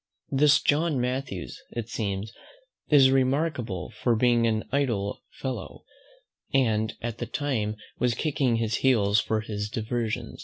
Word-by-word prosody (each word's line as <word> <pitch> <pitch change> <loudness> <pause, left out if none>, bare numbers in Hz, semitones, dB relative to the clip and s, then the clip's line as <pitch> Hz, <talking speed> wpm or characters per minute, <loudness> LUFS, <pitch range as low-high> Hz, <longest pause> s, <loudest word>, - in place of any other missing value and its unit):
This 145 +1 +5
John 150 0 +1
Mathews 125 - -3
it 115 -2 -4
seems 105 -2 -3 0.6
is 135 -3 +7
remarkable 130 - 0
for 115 +2 +1
being 120 0 +3
an 110 -1 -1
idle 115 -8 0
fellow, 130 -2 -6 0.7
and 110 -5 +1
at 115 -1 -4
that 120 -1 -6
time 115 -8 -1 0.2
was 125 -2 +2
kicking 135 -5 +1
his 115 -1 0
heels 105 -6 +3
for 110 0 0
his 105 -1 -4
diversion. 115 0 -3
120 Hz, 130 wpm, -27 LUFS, 110-135 Hz, 0.7 s, is